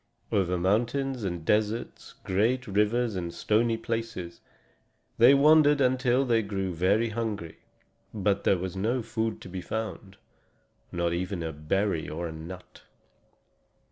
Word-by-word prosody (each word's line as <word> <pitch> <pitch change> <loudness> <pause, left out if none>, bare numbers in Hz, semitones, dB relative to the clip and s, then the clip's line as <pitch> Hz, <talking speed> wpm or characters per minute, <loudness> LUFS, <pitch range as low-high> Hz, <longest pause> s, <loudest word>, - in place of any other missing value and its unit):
Over 90 -3 +1
mountains 120 +7 0
and 85 -4 -4
deserts, 110 +3 -1
great 115 +7 +1
rivers 105 +2 +1
and 85 -2 -3
stony 115 +5 +1
places, 115 -6 -5 0.8
they 125 +4 +8
wandered 150 0 +5
until 130 0 +2
they 115 -3 +3
grew 95 -3 -3
very 100 +7 +2
hungry. 105 -7 -4 0.5
But 100 -2 0
there 95 - +3
was 95 +1 -5
no 115 +6 0
food 115 -1 -2
to - - -9
be 90 0 -6
found 100 -1 -5 0.7
not 85 -1 -1
even 90 0 -3
a 80 0 -4
berry 80 +4 -1
or 85 +3 -4
a - - -6
nut. 85 +3 -10
105 Hz, 135 wpm, -27 LUFS, 90-115 Hz, 0.8 s, they